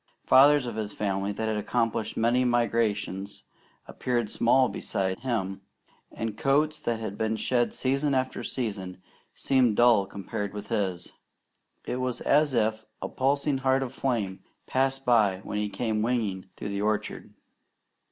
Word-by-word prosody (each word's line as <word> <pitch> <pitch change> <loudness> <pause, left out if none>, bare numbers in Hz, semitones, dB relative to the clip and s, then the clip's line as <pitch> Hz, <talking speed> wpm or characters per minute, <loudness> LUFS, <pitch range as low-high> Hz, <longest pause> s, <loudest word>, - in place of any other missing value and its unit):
Fathers 145 +1 +6
of 115 -3 -5
his 105 -2 -3
family 100 -1 -1
that 110 +2 -3
had 110 -1 0
accomplished 110 0 -1
many 120 +3 +3
migrations 110 -5 0 0.4
appeared 120 -4 -2
small 130 +2 +4
beside 95 -4 -2
him, 100 -6 -2 0.5
and 115 -2 -4
coats 150 +4 +1
that 120 -6 -2
had 105 -2 -5
been 110 0 0
shed 120 +1 0
season 135 +2 0
after 130 0 -1
season 100 -7 -4 0.4
seemed 125 -5 +2
dull 115 -5 +5
compared 100 +1 -5
with 105 0 -7
his. 95 -4 -2 0.7
It 125 - -2
was 130 -1 -2
as 145 -2 +3
if 110 -1 +1 0.2
a - - -3
pulsing 140 +1 0
heart 135 0 +2
of 130 -1 -6
flame 115 -9 -1 0.3
passed 135 +1 0
by 105 -6 +3
when 105 - -3
he 105 0 -1
came 110 +1 -1
winging 110 -5 -1
through - - -5
the 100 0 -2
orchard. 105 0 -2
115 Hz, 150 wpm, -27 LUFS, 105-130 Hz, 0.7 s, Fathers